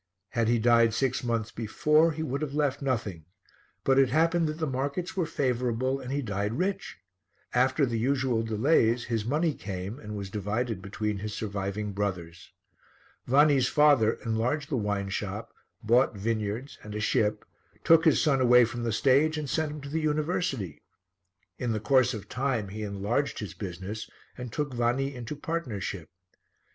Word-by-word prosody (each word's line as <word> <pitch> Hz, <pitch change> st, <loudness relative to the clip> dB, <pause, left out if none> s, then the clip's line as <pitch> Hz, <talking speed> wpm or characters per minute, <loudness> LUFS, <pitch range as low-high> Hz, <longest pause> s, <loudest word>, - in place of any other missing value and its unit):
Had 115 Hz, -2 st, 0 dB
he 120 Hz, +1 st, +3 dB
died 115 Hz, -1 st, +4 dB
six 130 Hz, 0 st, 0 dB
months 115 Hz, -2 st, -1 dB
before, 150 Hz, +8 st, +2 dB
he 160 Hz, +1 st, -4 dB
would 140 Hz, -1 st, -3 dB
have 145 Hz, -2 st, -3 dB
left 145 Hz, -2 st, 0 dB
nothing, 110 Hz, -, -2 dB, 0.6 s
but 135 Hz, 0 st, +4 dB
it 135 Hz, -2 st, +4 dB
happened 165 Hz, +4 st, +2 dB
that 155 Hz, 0 st, -3 dB
the 160 Hz, -, -1 dB
markets 140 Hz, +6 st, -3 dB
were 180 Hz, -4 st, 0 dB
favourable 130 Hz, -2 st, 0 dB
and 125 Hz, -, -7 dB
he 140 Hz, 0 st, -1 dB
died 105 Hz, -1 st, -2 dB
rich. 190 Hz, +2 st, -2 dB, 0.6 s
After 130 Hz, +3 st, +3 dB
the 115 Hz, -3 st, -2 dB
usual 130 Hz, -1 st, +1 dB
delays, 115 Hz, +1 st, +2 dB
his 115 Hz, -3 st, -2 dB
money 155 Hz, +5 st, +1 dB
came 95 Hz, +3 st, -6 dB
and 105 Hz, -3 st, -7 dB
was 100 Hz, -1 st, -6 dB
divided 105 Hz, +1 st, -2 dB
between 105 Hz, +1 st, -3 dB
his 105 Hz, +1 st, -5 dB
surviving 100 Hz, 0 st, -3 dB
brothers. 90 Hz, -4 st, -4 dB, 0.8 s
Vanni's 140 Hz, -1 st, +5 dB
father 145 Hz, -8 st, +4 dB
enlarged 120 Hz, +6 st, -1 dB
the -, -, +1 dB
wine 100 Hz, -3 st, -1 dB
shop, -, -, -4 dB, 0.3 s
bought 120 Hz, +2 st, +3 dB
vineyards 110 Hz, +4 st, -3 dB
and 105 Hz, -1 st, -8 dB
a -, -, -2 dB
ship, 105 Hz, 0 st, +1 dB, 0.4 s
took 165 Hz, 0 st, +6 dB
his 160 Hz, -4 st, +4 dB
son 135 Hz, -3 st, +2 dB
away 125 Hz, -1 st, +6 dB
from 120 Hz, +1 st, -5 dB
the 115 Hz, -1 st, -1 dB
stage 140 Hz, +7 st, +3 dB
and 150 Hz, -3 st, -3 dB
sent 155 Hz, -2 st, 0 dB
him 150 Hz, 0 st, -7 dB
to 140 Hz, -, -8 dB
the 160 Hz, +2 st, -1 dB
University. 150 Hz, -, -1 dB, 0.8 s
In 115 Hz, -3 st, -1 dB
course 130 Hz, 0 st, +3 dB
of 105 Hz, -, -8 dB
time 125 Hz, -6 st, -1 dB
he 110 Hz, +2 st, -6 dB
enlarged 105 Hz, +7 st, -1 dB
his 105 Hz, -, -5 dB
business 100 Hz, +2 st, -6 dB, 0.3 s
and 125 Hz, -2 st, -7 dB
took 145 Hz, +1 st, -3 dB
Vanni 120 Hz, +3 st, 0 dB
into 125 Hz, +3 st, -6 dB
partnership. 110 Hz, -, -4 dB
120 Hz, 165 wpm, -28 LUFS, 105-140 Hz, 0.8 s, took